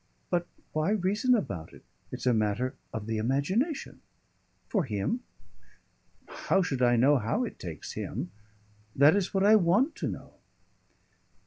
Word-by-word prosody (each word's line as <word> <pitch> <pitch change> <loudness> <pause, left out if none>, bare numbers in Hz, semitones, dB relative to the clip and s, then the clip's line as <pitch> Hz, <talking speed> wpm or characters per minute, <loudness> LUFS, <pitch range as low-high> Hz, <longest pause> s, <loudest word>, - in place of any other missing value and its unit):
"But 175 -1 +1 0.3
why 155 +3 +1
reason 210 +5 +2
about 95 - -4
it? - - -15 0.3
It's - - -6
a 125 - +4
matter 110 +3 0 0.2
of 110 -2 -5
the 110 0 -2
imagination 165 - -1 0.3
" - - -42
"For 195 -8 0
him?" 105 - -1 1.1
"How 195 0 0
should 135 -7 -2
I 120 -1 +5
know 135 +4 +4
how 125 - 0
it 240 - -6
takes 85 -4 -7
him? 90 - -5 0.6
That 145 +5 +6
is 200 -2 0
what 195 0 +1
I 210 +2 +7
want 205 - +2
to - - -2
know." - - -7
150 Hz, 150 wpm, -29 LUFS, -, 1.1 s, I